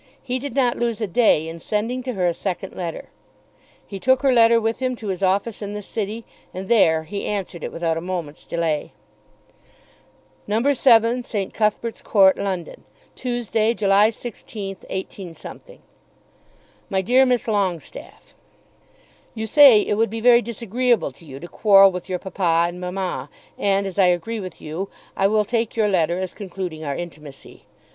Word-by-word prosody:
He 255 -1 -2
did 280 -2 -6
not 250 -3 +1
lose 235 -2 -1
a 220 - -1
day 185 -6 +2
in 165 +1 -7
sending 225 +7 -2
to 255 0 -4
her 185 -4 -1
a 175 - +2
second 190 +2 -5
letter. 170 -3 -6 0.8
He 195 - -8
took 260 +6 +2
her 270 - +4
letter 230 -1 +5
with 225 +1 -2
him 255 -1 -1
to 220 -3 -7
his 185 -1 -3
office 200 +4 0
in 205 0 -5
the 210 0 -6
city, 220 +2 -5 0.3
and 190 +1 -6
there 160 -8 +3
answered 200 -4 -4
it - - -4
without 165 -1 -1
a - - -3
moment's 175 -4 -5
delay. 165 -3 -2 1.5
No. 230 +7 +2
7, 235 -2 +4
St. 205 -5 -4
Cuthbert's 220 +1 -1
Court, 190 -3 +4
London, 185 -4 -4 0.3
Tuesday, 235 -2 -1
July 205 0 +4
16, 210 -4 -7
18. 190 -2 -6 1.5
MY 190 - +1
DEAR 255 +6 +4
MISS 250 -3 +1
LONGESTAFFE, 195 -6 -4 1.0
You 220 0 -3
say 255 -2 +7
it - - -1
would 225 - +2
be 225 +2 -5
very 240 +1 +6
disagreeable 235 - 0
to 150 +6 -18
you 135 -1 -9
to 175 - -9
quarrel 195 0 +6
with 180 0 -7
your 185 - -1
papa 170 -3 +1
and 180 +1 -9
mamma; 180 +1 -4 0.3
and 200 0 +1
as 195 0 -5
I 190 - +6
agree 180 +6 -1
with 185 -4 -8
you, 165 +6 -5 0.3
I 195 - +3
will 210 +1 +2
take 230 0 -1
your 215 -2 +2
letter 175 -2 +1
as 185 -1 -4
concluding 180 -5 -6
our 140 -2 -3
intimacy. 150 -5 -10
200 Hz, 165 wpm, -22 LUFS, 180-230 Hz, 1.5 s, say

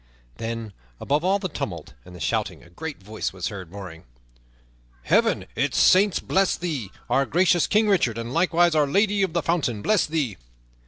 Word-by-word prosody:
Then, 115 -2 -5 0.3
above 145 +3 0
all 190 +2 +3
the 195 -2 -3
tumult 85 - -6
and 90 - -12
the - - -11
shouting - - -2
a 85 - -18
great 150 - -7
voice 110 +2 -4
was 90 -2 -4
heard 95 -5 -8
roaring, 95 -5 -9 1.0
"Heaven, - - +2
its - - 0
saints 195 0 +5
bless 195 0 +1
thee, 150 - -4 0.2
our 135 - +2
gracious 175 -1 +3
King 215 +1 +3
Richard! 155 - +2
and 115 +2 -5
likewise 170 0 +3
Our 150 -2 +3
Lady 200 +6 +2
of 190 -4 0
the 170 -2 0
Fountain, 135 -11 -1
bless 215 -3 +2
thee!" 150 -9 -2
150 Hz, 175 wpm, -24 LUFS, -, 1.0 s, saints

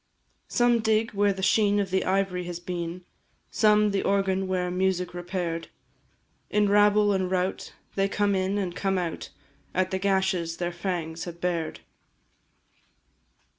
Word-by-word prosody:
Some 240 -1 +3
dig 220 0 +1
where 205 0 +2
the 190 -1 -5
sheen 205 +1 +3
of 195 -2 -2
the 190 0 +1
ivory 185 -1 0
has 175 -1 -5
been, 175 0 -5 0.5
Some, 210 -1 +4
the 200 - 0
organ 195 -1 +1
where 180 -1 -1
music 180 -1 0
repair'd; 175 -2 -3 0.8
In 210 0 +2
rabble 205 0 +4
and 190 -1 0
rout 185 0 -2 0.2
they 195 0 +1
come 205 0 +1
in 190 +1 0
and 185 -3 -2
come 195 0 0
out 175 -3 -3 0.5
At 185 0 +1
the 190 - -1
gashes 190 -4 0
their 175 0 -2
fangs 170 -2 -3
have 170 -1 -8
bared. 170 -2 -2
190 Hz, 145 wpm, -26 LUFS, 180-200 Hz, 0.8 s, Some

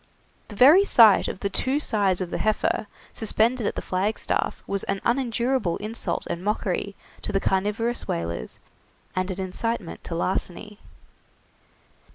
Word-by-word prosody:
The 210 - -10
very 295 - +7
sight 225 - +6
of - - -5
the 200 - -1
two 265 +7 0
sides 200 -9 +1
of 180 -1 -4
the - - -2
heifer 215 0 0 0.3
suspended 225 +1 +1
at - - -2
the - - -4
flagstaff 195 +4 -1
was 200 -1 -2
an 195 0 -2
unendurable 240 -5 0
insult 210 -4 -3
and 170 - -4
mockery 200 -1 -2 0.3
to - - -3
the 195 - +1
carnivorous 210 +6 -1
whalers, 85 -6 -4 0.6
and 185 +1 -1
an 190 0 -4
incitement 190 +1 -3
to 165 - -4
larceny. 185 +4 -3
205 Hz, 145 wpm, -25 LUFS, 185-230 Hz, 0.6 s, very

